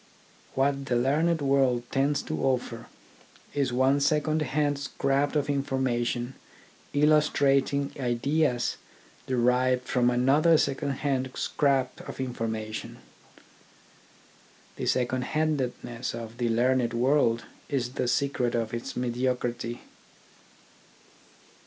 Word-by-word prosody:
What 140 Hz, +1 st, +1 dB
the 125 Hz, -, 0 dB
learned 150 Hz, +6 st, +2 dB
world 135 Hz, -3 st, +2 dB
tends 140 Hz, +1 st, +1 dB
to 155 Hz, -, -4 dB
offer 125 Hz, -3 st, -1 dB, 0.7 s
is 140 Hz, -3 st, 0 dB
one 130 Hz, +3 st, +3 dB
second 155 Hz, +2 st, +1 dB
hand 145 Hz, -1 st, 0 dB
scrap 140 Hz, +1 st, 0 dB
of 145 Hz, -1 st, +1 dB
information 130 Hz, -3 st, -1 dB, 0.6 s
illustrating 140 Hz, -2 st, +3 dB
ideas 125 Hz, +1 st, 0 dB, 0.5 s
derived 125 Hz, 0 st, +2 dB
from 125 Hz, -1 st, +2 dB
another 140 Hz, +7 st, +4 dB
second 140 Hz, 0 st, -1 dB
hand 130 Hz, -2 st, 0 dB
scrap 135 Hz, -3 st, 0 dB
of -, -, -8 dB
information. 110 Hz, -4 st, -4 dB, 1.8 s
The -, -, -4 dB
second 125 Hz, 0 st, +1 dB
handedness 130 Hz, -5 st, -2 dB
of 115 Hz, +1 st, -8 dB
the 120 Hz, -1 st, +1 dB
learned 120 Hz, +1 st, +2 dB
world 120 Hz, -2 st, +2 dB, 0.3 s
is 130 Hz, -4 st, -1 dB
the 125 Hz, -, -1 dB
secret 125 Hz, -2 st, 0 dB
of 115 Hz, -1 st, -2 dB
its 120 Hz, +3 st, -5 dB
mediocrity. 120 Hz, -1 st, -2 dB
130 Hz, 100 wpm, -27 LUFS, 120-140 Hz, 1.8 s, another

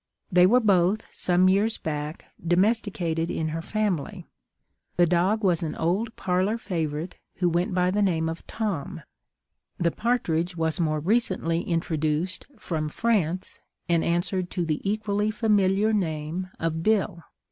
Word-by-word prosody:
They 180 Hz, 0 st, +6 dB
were 245 Hz, +6 st, +5 dB
both, 200 Hz, -2 st, +2 dB
some 180 Hz, +1 st, +2 dB
years 205 Hz, +4 st, +2 dB
back, 150 Hz, 0 st, -4 dB, 0.2 s
domesticated 175 Hz, -3 st, +1 dB
in 160 Hz, -1 st, -2 dB
her 165 Hz, +1 st, -3 dB
family. 200 Hz, -4 st, -2 dB, 0.7 s
The 175 Hz, -, +5 dB
dog 180 Hz, +6 st, +1 dB
was 180 Hz, -4 st, +2 dB
an 160 Hz, -2 st, -3 dB
old 195 Hz, +8 st, -1 dB
parlour 185 Hz, +4 st, 0 dB
favourite, 165 Hz, -5 st, -3 dB, 0.2 s
who 180 Hz, -, +1 dB
went 175 Hz, +2 st, 0 dB
by 180 Hz, 0 st, +2 dB
the 205 Hz, +2 st, +1 dB
name 165 Hz, -5 st, +1 dB
of 165 Hz, +1 st, -6 dB
Tom; 205 Hz, -10 st, -3 dB, 0.7 s
the 170 Hz, -1 st, +1 dB
partridge 180 Hz, -8 st, 0 dB
was 160 Hz, +1 st, -1 dB
more 155 Hz, -2 st, +1 dB
recently 180 Hz, -3 st, +1 dB
introduced 165 Hz, +1 st, -1 dB
from 155 Hz, -7 st, -3 dB
France, 185 Hz, -3 st, -1 dB, 0.3 s
and 170 Hz, -2 st, +2 dB
answered 175 Hz, +2 st, 0 dB
to 175 Hz, -2 st, -2 dB
the 155 Hz, -2 st, -1 dB
equally 205 Hz, 0 st, 0 dB
familiar 210 Hz, -1 st, +2 dB
name 165 Hz, -1 st, -2 dB
of 160 Hz, 0 st, -1 dB
Bill. 200 Hz, -3 st, +1 dB
180 Hz, 140 wpm, -26 LUFS, 165-205 Hz, 0.7 s, They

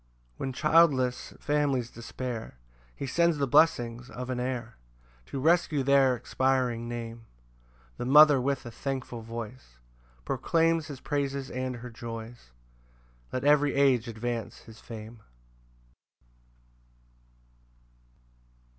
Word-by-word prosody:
4 -, -, -2 dB
When -, -, -2 dB
childless 140 Hz, -5 st, +3 dB
families 140 Hz, -5 st, 0 dB
despair, 115 Hz, -, -6 dB, 0.4 s
He -, -, -5 dB
sends 170 Hz, +4 st, +2 dB
the 140 Hz, -, +1 dB
blessings 120 Hz, -4 st, +2 dB
of 125 Hz, +1 st, -6 dB
an 125 Hz, -, -2 dB
heir 125 Hz, -2 st, -4 dB, 0.5 s
To 135 Hz, -, -5 dB
rescue 160 Hz, -1 st, +2 dB
their 135 Hz, -1 st, +4 dB
expiring 125 Hz, -1 st, 0 dB
name: 115 Hz, -1 st, -7 dB, 0.7 s
The -, -, -4 dB
mother 145 Hz, 0 st, +7 dB
with 140 Hz, +1 st, -1 dB
a 120 Hz, -, -7 dB
thankful 130 Hz, -1 st, -4 dB
voice 115 Hz, -, -8 dB, 0.5 s
Proclaims 165 Hz, -1 st, +1 dB
his 140 Hz, -4 st, -8 dB
praises 140 Hz, -2 st, -2 dB
and 130 Hz, 0 st, -3 dB
her 120 Hz, +1 st, -9 dB
joys: 115 Hz, -, -8 dB, 0.8 s
Let 130 Hz, -, -3 dB
every 145 Hz, 0 st, +4 dB
age 130 Hz, -4 st, +3 dB
advance 115 Hz, -1 st, -4 dB
his 110 Hz, 0 st, -14 dB
fame. 115 Hz, 0 st, -10 dB
130 Hz, 110 wpm, -28 LUFS, 120-140 Hz, 0.8 s, mother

